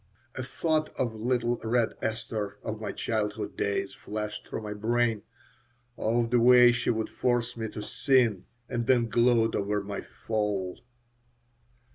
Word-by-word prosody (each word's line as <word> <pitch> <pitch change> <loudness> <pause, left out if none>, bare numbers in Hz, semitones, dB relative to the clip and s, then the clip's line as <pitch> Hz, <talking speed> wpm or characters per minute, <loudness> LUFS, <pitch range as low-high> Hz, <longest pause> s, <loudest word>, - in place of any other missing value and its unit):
A 130 - -4
thought 155 +4 0
of 120 -3 0
little 120 +1 0
Red 115 0 +1
Esther 110 -2 -3
of 110 -1 -4
my 105 - -3
childhood 105 -2 -2
days 100 -1 -1
flashed 105 0 -5
through 110 - -5
my 105 0 -4
brain, 115 +1 +1 0.7
of 115 +1 0
the 120 - +4
way 125 0 +8
she 120 - -1
would 110 -1 0
force 120 -1 0
me 110 -1 -4
to 105 - -6
"sin" 115 -6 +2 0.2
and 120 -1 -2
then 120 -3 +3
gloat 115 -1 +3
over 105 0 0
my 100 0 -4
"fall." 105 -4 -3
115 Hz, 145 wpm, -28 LUFS, 105-120 Hz, 0.7 s, way